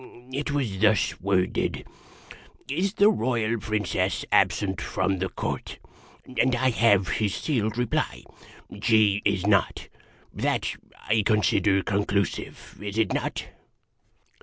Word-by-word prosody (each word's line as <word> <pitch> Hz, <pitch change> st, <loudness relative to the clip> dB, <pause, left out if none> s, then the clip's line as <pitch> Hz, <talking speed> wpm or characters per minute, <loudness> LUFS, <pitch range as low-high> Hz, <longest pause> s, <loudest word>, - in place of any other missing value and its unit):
It 145 Hz, +2 st, -2 dB
was 130 Hz, -10 st, -2 dB
thus 105 Hz, -1 st, +2 dB
worded: 95 Hz, -1 st, 0 dB, 0.4 s
' -, -, -15 dB, 0.3 s
Is 185 Hz, +9 st, -1 dB
the 205 Hz, +1 st, +6 dB
Royal 115 Hz, -, 0 dB
Princess 100 Hz, -3 st, -1 dB
absent 95 Hz, -2 st, +2 dB
from 95 Hz, -2 st, -1 dB
the 95 Hz, +1 st, -1 dB
Court? -, -, -4 dB, 0.3 s
' 130 Hz, -, -17 dB
And 125 Hz, 0 st, +2 dB
I 130 Hz, +1 st, +2 dB
have 100 Hz, -5 st, +3 dB
his 105 Hz, -3 st, 0 dB
sealed 115 Hz, -7 st, -1 dB
reply: 125 Hz, -2 st, -1 dB, 0.3 s
' 100 Hz, -, -15 dB
She 105 Hz, -2 st, +3 dB
is 100 Hz, -2 st, +1 dB
not.' 100 Hz, -3 st, +1 dB, 0.4 s
That -, -, -1 dB, 0.3 s
I 110 Hz, +1 st, +3 dB
consider 100 Hz, -2 st, +2 dB
conclusive. 100 Hz, -1 st, -2 dB
Is 105 Hz, 0 st, -5 dB
it 110 Hz, -, +1 dB
not?" -, -, -2 dB
105 Hz, 130 wpm, -26 LUFS, 100-120 Hz, 0.4 s, the